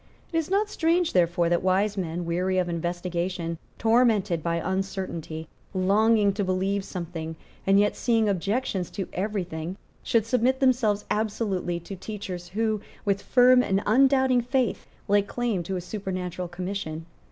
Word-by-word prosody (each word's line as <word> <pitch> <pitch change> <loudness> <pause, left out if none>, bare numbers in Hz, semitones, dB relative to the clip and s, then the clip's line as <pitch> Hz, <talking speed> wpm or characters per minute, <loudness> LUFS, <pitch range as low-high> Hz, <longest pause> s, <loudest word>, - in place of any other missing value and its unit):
It - - +1
is 320 - -3
not 405 +2 +2
strange, 345 -3 +1
therefore, 175 -1 +3
that 175 0 +2
wise 195 +3 +2
men, 175 -2 -3
weary 180 +3 0
of 180 -1 +1
investigation, 175 0 -3 0.2
tormented 225 -7 +3
by 170 +1 -1
uncertainty, 185 -3 -3 0.3
longing 205 +2 +3
to 200 +1 -1
believe 190 +1 0
something, 165 -4 -5 0.3
and 195 +1 +6
yet 205 0 +2
seeing 225 -3 +2
objections 200 0 -1
to 195 -3 -4
every 200 +1 -1
thing, 170 +2 -6 0.2
should 225 -2 +1
submit 250 +2 +2
themselves 240 -6 +2
absolutely 205 -5 -1
to 195 +4 -7
teachers 185 -3 -6
who, 215 +1 0 0.2
with 200 -1 +1
firm 250 0 +5
and 195 -4 0
undoubting 260 +2 +4
faith, 250 -2 -1 0.2
lay 205 0 +4
claim 220 -1 -2
to 190 +3 -4
a 180 - -2
supernatural 185 -2 -4
commission. 175 -2 -5
195 Hz, 150 wpm, -26 LUFS, 175-225 Hz, 0.3 s, and